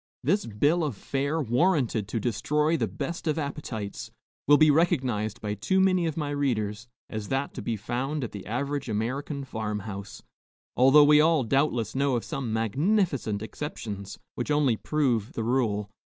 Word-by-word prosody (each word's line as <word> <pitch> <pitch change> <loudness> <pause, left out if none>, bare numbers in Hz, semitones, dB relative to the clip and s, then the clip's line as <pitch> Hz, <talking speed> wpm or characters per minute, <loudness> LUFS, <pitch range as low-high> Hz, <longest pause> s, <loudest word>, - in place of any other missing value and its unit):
This 190 - +1
bill 145 +11 +2
of 140 -9 -2
fare, 140 +7 -1
warranted 125 - +1
to 115 - -2
destroy 150 +8 +1
the - - 0
best 165 +3 -5
of 155 0 +1
appetites, 140 -9 -5 0.4
will 145 +1 +7
be 155 0 +6
recognized 130 - +1
by 105 -1 -2
too 110 - 0
many 185 -3 +3
of 160 - -3
my 150 -2 -2
readers 115 -6 -1 0.2
as 110 -2 -5
that 135 +4 -2
to - - -6
be 115 - -2
found 130 +7 -3
at 120 - -4
the 100 -2 -8
average 140 +4 -2
American 130 +7 -2
farm 110 -4 -4
house, 100 -1 -8 0.5
although 135 +4 +7
we 150 0 +7
all 160 -3 +3
doubtless 120 -3 +1
know 140 -1 +1
of 120 - -2
some 130 -5 -4
magnificent 130 - 0
exceptions, 105 -6 -6 0.2
which 120 - -4
only 145 -5 +3
prove 120 -5 0
the 115 - -3
rule. 110 -4 0
135 Hz, 170 wpm, -27 LUFS, 110-150 Hz, 0.5 s, will